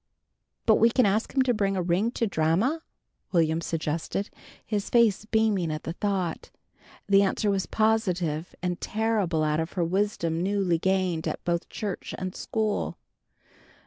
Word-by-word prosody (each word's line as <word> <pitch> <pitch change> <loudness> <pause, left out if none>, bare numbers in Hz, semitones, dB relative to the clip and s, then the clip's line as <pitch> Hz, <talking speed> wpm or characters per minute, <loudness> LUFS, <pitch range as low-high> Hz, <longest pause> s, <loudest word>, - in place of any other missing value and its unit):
"But 220 - +5
we 230 - +5
can 250 +2 +3
ask 210 +3 +1
him 265 - +3
to 250 -1 +2
bring 200 -3 0
a - - +1
ring 180 +6 +1
to 230 - 0
Dranma," 195 - +1 0.5
Will'm 165 -2 +2
suggested, 165 +4 -2 0.3
his 210 -2 -2
face 225 -4 +3
beaming 215 -7 +1
at 155 0 -4
the 165 - -4
thought. 185 -3 -2 0.6
The 200 0 +6
answer 200 +1 +1
was 195 -2 -1
positive 180 -8 0
and 180 -1 -2
terrible 210 -7 0
out 150 0 +1
of 160 +2 -3
her 175 -3 0
wisdom 170 -3 0
newly 190 -3 +1
gained 185 -3 0
at - - -4
both 170 -1 -1
church 205 -3 -5
and 185 0 -4
school. 215 -2 -2
190 Hz, 155 wpm, -27 LUFS, 170-215 Hz, 0.6 s, The